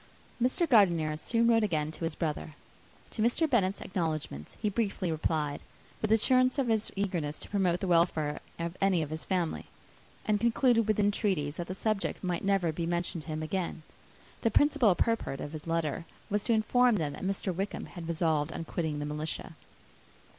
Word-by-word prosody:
Mr. 260 +8 +2
Gardiner 170 - +4
soon 230 +9 +1
wrote 230 -1 +5
again 155 -6 0
to 160 - -8
his 165 -1 -3
brother. 155 -2 -3 0.6
To 220 - -3
Mr. 245 +8 +3
Bennet's 200 -8 +1
acknowledgments 155 - -3
he 215 - -1
briefly 200 -4 -1
replied, 155 -2 -1 0.4
with 215 - 0
assurances 255 +4 +4
of 265 -4 +1
his 220 -1 +1
eagerness 175 -7 -2
to - - -8
promote 185 -4 +1
the 190 - -1
welfare 165 -4 +2 0.2
of 170 +1 -4
any 190 -4 +3
of 155 - -7
his 160 0 -4
family; 180 -4 -1 0.6
and 210 -1 +2
concluded 235 0 +3
with 215 -1 +1
entreaties 195 -8 +1
that 175 - -4
the 185 - -4
subject 215 -1 -1
might 180 -2 -1
never 195 -4 +2
be 165 +1 -3
mentioned 175 -1 -1
to - - -16
him 155 0 -3
again. 170 -1 -3 0.6
The 230 - +3
principal 270 -5 +4
purport 230 -12 0
of 145 - -5
his 155 0 -8
letter 165 0 -1 0.3
was 205 0 +1
to 235 - +3
inform 240 +2 +4
them, 155 -7 -1
that - - -9
Mr. 190 0 -1
Wickham 195 +4 -3
had 170 -3 -8
resolved 160 -2 +1
on 165 - -5
quitting 160 -3 -2
the 145 - -3
militia. 150 +1 -4
180 Hz, 185 wpm, -30 LUFS, 160-215 Hz, 0.6 s, wrote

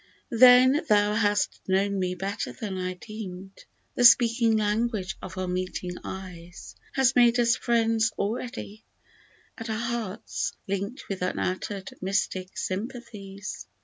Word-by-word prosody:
41 230 - -3 0.3
Then 300 - -1
thou 205 0 +4
hast 205 -1 +1
known 195 +1 +1
me 180 -1 -1
better 195 +4 -4
than 210 -5 -5
I 185 0 -3
deemed; 195 -2 -9 0.3
The 245 - 0
speaking 230 -2 +6
language 210 -2 -1
of 185 0 -8
our 185 0 -2
meeting 180 0 -3
eyes 180 -2 -9 0.2
Has 265 -1 +3
made 240 0 +5
us 235 -1 +4
friends 225 -1 +1
already, 220 0 -4 0.8
and 225 0 -6
our 220 - -1
hearts 230 -2 -3
Linked 200 +5 -4
with 195 -2 -5
unuttered 185 +2 -2
mystic 190 -1 -2
sympathies 205 -1 -6
205 Hz, 130 wpm, -26 LUFS, 185-230 Hz, 0.8 s, speaking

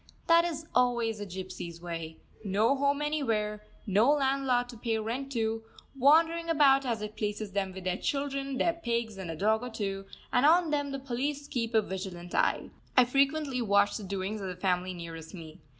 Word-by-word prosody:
That 335 0 +5
is 320 -2 -4
always 235 -3 +2
the 205 - -5
gypsies' 180 -2 -7
way: 165 -2 -6 0.3
no 210 +6 +2
home 280 +1 +1
anywhere, 225 -9 -1 0.2
no 210 +4 +3
landlord 270 -3 +1
to 240 - -9
pay 225 0 -1
rent 240 +5 -3
to, 225 -1 -1 0.3
wandering 325 +5 +4
about 275 -4 +5
as 225 -3 -1
it 210 0 -6
pleases 210 -1 -3
them 195 -1 -1
with 190 0 -9
their 185 0 -1
children, 275 -1 -2
their 335 +4 +2
pigs, 235 - -2
and 185 -3 -5
a 165 - -3
dog 215 +6 +2
or 250 - -5
two; 195 -3 -4 0.3
and 245 - +4
on 330 +2 +5
them 285 -1 0
the 275 - -3
police 275 +2 -3
keep 230 -4 -2
a 220 - +5
vigilant 185 -2 -6
eye. - - +1 0.3
I 255 - +8
frequently 275 +1 +1
watch 205 -2 +3
the 215 - -5
doings 200 +2 -3
of 195 - -4
the 180 - -5
family 180 0 -1
nearest 165 0 -8
me. 160 -3 -10
225 Hz, 190 wpm, -30 LUFS, 195-275 Hz, 0.3 s, I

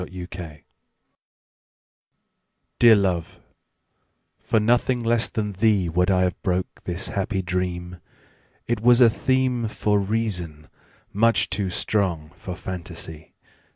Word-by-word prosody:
The 90 -1 -7
Dream 85 -5 -9 2.2
DEAR 115 -2 +8
love, 90 -5 -1 1.0
for 110 - +1
nothing 120 +2 +1
less 115 0 +2
than 105 -3 -3
theeWould 95 -3 +2
I 95 -1 +3
have 90 -1 -2
broke 90 -1 -3
this 90 +1 -3
happy 95 0 -2
dream; 90 -1 -3 0.7
It 120 -2 -2
was 120 +1 +5
a 120 -2 +7
themeFor 120 -5 0
reason, 90 -9 -2 0.4
much 115 +3 +2
too 100 -3 -1
strong 90 -5 -1
for 90 - -7
fantasy. 85 -4 -7
95 Hz, 110 wpm, -23 LUFS, 90-115 Hz, 2.2 s, DEAR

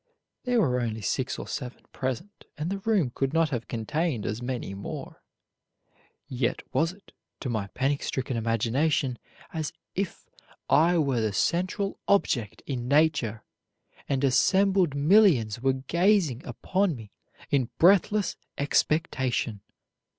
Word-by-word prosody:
There 245 -1 +2
were 125 - +2
only 110 -2 -3
six 130 +5 -1
or - - -7
seven 130 -3 -6
present, 130 - -5
and 155 +4 -3
the 195 - -2
room 195 - +1
could 135 +1 -1
not 165 -1 +2
have 120 -3 -3
contained 125 +2 -2
as 110 +3 -3
many 120 -5 -4
more; 100 0 -7 1.1
yet 125 -1 -1
was 165 +1 +2
it, 195 +2 -19 0.3
to 130 - -3
my 110 -4 -2
panic 140 +2 0
stricken 130 -1 -2
imagination, 120 +4 0 0.3
as 155 -3 -3 0.2
if 195 -1 -3 0.4
I 165 +5 +4
were 135 -7 +1
the 110 -2 0
central 185 - 0
object 125 - +1
in 125 -3 -3
nature, 140 -7 +2 0.7
and 135 -1 0
assembled 190 +4 +3
millions 145 - +4
were 135 0 +3
gazing 165 - +1
upon 190 -3 0
me 110 -4 -11 0.4
in 130 -4 +2
breathless 200 +3 +4 0.2
expectation. 130 - 0
140 Hz, 130 wpm, -27 LUFS, 120-175 Hz, 1.1 s, I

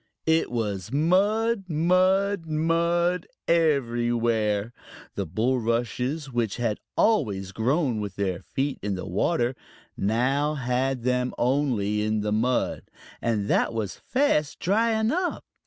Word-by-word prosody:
It 160 0 +2
was 105 -5 -3
mud, 200 - +2
mud, 185 +3 +2
mud 170 +3 +1 0.2
everywhere! 120 -8 +1 0.4
The - - -3
bulrushes, 125 - -1
which 115 -4 -1
had 115 -3 -1 0.2
always 100 - +1
grown 125 - 0
with 100 -2 -5
their 95 -2 -2
feet 135 +7 -3
in 100 -1 -2
the 90 - -5
water, 120 - 0 0.4
now 135 +8 +1
had 130 -1 -1
them 125 0 0
only 120 -6 +1
in 110 0 0
mud, 110 +4 0 0.4
and 105 -4 0
that - - +2
was 105 -5 -4
fast 255 - +1
drying 220 +3 +2
up. 360 +3 -2
125 Hz, 115 wpm, -26 LUFS, 110-165 Hz, 0.4 s, It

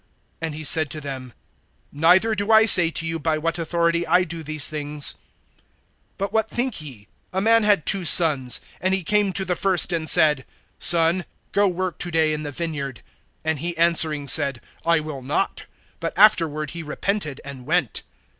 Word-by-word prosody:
And 160 -2 -4
he 155 - -8
said 155 0 +4
to 155 - -6
them: 135 -3 -8 0.6
Neither 180 +9 +3
do 205 +1 -2
I 220 0 +6
say 175 -6 +5
to 165 0 -6
you, 165 0 -4
by 155 0 -1
what 165 +2 -3
authority 170 +1 -1
I 180 +2 +3
do 170 -1 -7
these 155 -1 -1
things. 150 -1 -1 1.0
(28)But 200 0 -4
what 220 0 0
think 240 -6 -1
ye? 125 -9 -11 0.2
A 190 - -2
man 225 +3 +4
had 205 -6 +2
two 195 -2 0
sons; 150 -7 +3 0.2
and 185 +1 +1
he 190 - -4
came 205 +2 +1
to 190 - -2
the 180 -1 -1
first, 185 -1 +2
and 160 -2 -1
said: 150 -4 +4 0.4
Son, 170 +2 +4 0.3
go 205 0 +2
work 185 -2 -4
to 175 - -2
day 160 -2 +1
in 150 - -4
the 150 - -6
vineyard. 145 -4 -6 0.4
(29)And 160 -1 -1
he 170 +3 -5
answering 160 -3 +3
said: 140 -2 +2 0.2
I 170 -1 +2
will 150 -3 -8
not; 145 +9 -3 0.3
but 165 -1 -5
afterward 160 -8 +3
he 170 - -7
repented, 155 -1 -4
and 135 -2 -10
went. 170 -7 0
165 Hz, 185 wpm, -22 LUFS, 150-185 Hz, 1.0 s, I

